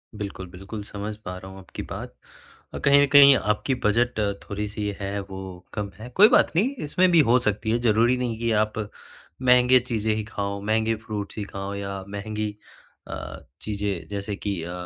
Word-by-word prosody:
बिल्कुल, 100 -2 -6
बिल्कुल, 95 +4 -8
समझ 105 +1 -6
पा 90 0 -5
रहा 95 +1 -10
हूँ 95 - -11
आपकी 95 - -8
बात। - - -6 0.6
अ, - - -4
कहीं 140 0 +5
न - - +3
कहीं 140 -1 +9
आपकी 105 +6 0
बजट 120 +2 +2 0.3
थोड़ी-सी 105 +1 -3
है, 100 0 -3
वो 95 -2 -8
कम 105 -2 -3
है। 115 +3 -8
कोई 205 +3 +9
बात - - +4
नहीं, 205 +10 +3 0.2
इसमें 180 +5 +3
भी 170 - +6
हो 125 - +6
सकती 105 -2 -1
है, 115 - +2
ज़रूरी 120 +2 +3
नहीं 120 -3 -2
कि 115 0 0
आप 110 0 -7 0.6
महँगे 125 0 +6
चीज़ें 110 -2 0
ही 110 - -2
खाओ, 100 -2 -4
महँगे 110 +2 +1
फ्रूट्स 105 -2 -5
ही 105 - -2
खाओ 100 0 -4
या 100 -1 -5
महँगी 105 +1 -4 0.5
अ, - - -6 0.5
चीज़ें, 100 -4 -3
जैसे 100 0 -4
कि 100 -3 -3
अ, 85 - -6
105 Hz, 185 wpm, -25 LUFS, 100-120 Hz, 0.6 s, कहीं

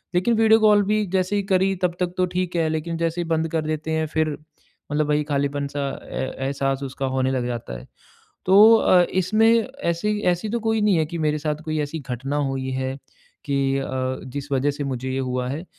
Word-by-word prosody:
लेकिन 185 +7 +2
video 220 0 +5
call 210 -1 +5
भी 210 +1 +1
जैसे 185 +2 +1
ही 200 - 0
करी 190 +1 +2
तब 175 -1 +1
तक 180 -1 -1
तो 185 - +3
ठीक 180 -1 -1
है 165 -2 +2
लेकिन 160 +1 -3
जैसे 165 +1 -1
ही - - -3
बंद 160 0 0
कर 160 - 0
देते 155 0 -3
हैं 160 0 0
फिर 155 -1 -1 0.5
मतलब 150 0 +1
वही 150 0 +2
खालीपन-सा 140 -1 -2 0.2
ए - - -2 0.2
एहसास 135 0 -1
उसका 135 0 -4
होने 130 0 +1
लग 130 -2 -1
जाता 115 - -5
है। - - -14 0.6
तो 205 +4 +8
अ, 185 -4 +5 0.2
इसमें 225 +4 +3 0.2
ऐसी 205 +5 0
ऐसी 175 +5 -4
तो 235 - 0
कोई 225 0 0
नहीं 205 -3 +3
है 160 - +2
कि 170 +2 -6
मेरे 155 -1 0
साथ 150 0 -1
कोई 155 -1 -2
ऐसी 150 +2 -3
घटना 135 +2 -4
हुई 135 -1 -3
है 130 0 -2 0.5
कि 140 -1 -1 0.2
अ, 135 - -3 0.4
जिस 140 +2 -7
वजह 135 +2 +2
से 145 0 -5
मुझे 130 -1 -3
ये 130 - -2
हुआ 125 -1 -2
है। 145 +6 -4
155 Hz, 215 wpm, -23 LUFS, 140-185 Hz, 0.6 s, तो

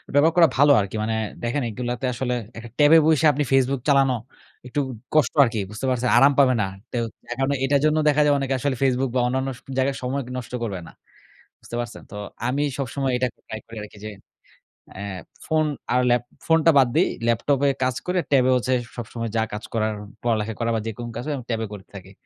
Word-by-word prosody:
ব্যবহার 155 +3 +5
করা 165 -2 +8
ভালো 145 +1 +6
আরকি। 100 +2 -5
মানে 110 +1 -1 0.3
দেখেন 120 +5 -1
এগুলাতে 125 +3 -4
আসলে 125 +1 -2 0.2
একটা 115 0 -8
ট্যাবে 150 +2 +7
বইসা 160 -1 +3
আপনি 145 +2 0
ফেসবুক 135 0 +3
চালানো 135 -2 +4 0.5
একটু 130 - -2 0.4
কষ্ট 150 -6 +3
আরকি 115 -3 -1
বুঝতে 110 +5 -5
পারছে? 125 -1 0
আরাম 140 +1 +6
পাবে 130 -2 +5
না। - - +1 0.3
টেও 120 -2 -1 0.3
এখন 135 +2 -1 0.2
এটার 140 +1 +3
জন্যও 155 0 +2
দেখা 150 +1 +3
যায় 145 - +4
অনেকে 135 -1 -1
আসলে 140 0 0
Facebook 130 0 +2
বা 125 - +3
অন্যান্য 130 +2 -1
স - - -17 0.2
জায়গায় 135 +1 +1
সময় 135 +2 -1 0.2
নষ্ট 125 -1 -7
করবে 100 -5 -3
না। - - -12 0.7
বুঝতে 120 - -8
পারছেন? 120 0 -7
তো 105 - -8 0.3
আমি 140 +3 0 0.2
সবসময় 135 0 -2
এটা 125 +1 +1 0.2
ট্রাই 110 0 -6
করি 115 - -11
আরকি 105 - -13
যে 110 - -5 0.9
অ্যা 95 - -6 0.4
ফোন 155 0 +2 0.3
আর 125 - +3
ল্যাপ 120 0 +3 0.2
ফোনটা 165 0 +4
বাদ 130 -3 +6
দেই। - - +4 0.2
ল্যাপটপে 140 +4 +2
কাজ 130 -1 0
করে, 180 0 +1
ট্যাবে 130 -2 +4
হচ্ছে 125 +1 0 0.2
সবসময় 115 0 -5
যা 110 - +3
কাজ 105 - -5
করার 110 -1 0 0.3
পড়ালেখা 115 -2 0
করা 115 0 0
বা - - 0
যেকোনো 120 +2 -5
কাজ 120 - -4
হয় 150 - -1
আমি 125 - -8
ট্যাবে 115 0 -1
করে 95 -2 -9
থাকি। 95 -1 -10
130 Hz, 200 wpm, -23 LUFS, 115-140 Hz, 0.9 s, করা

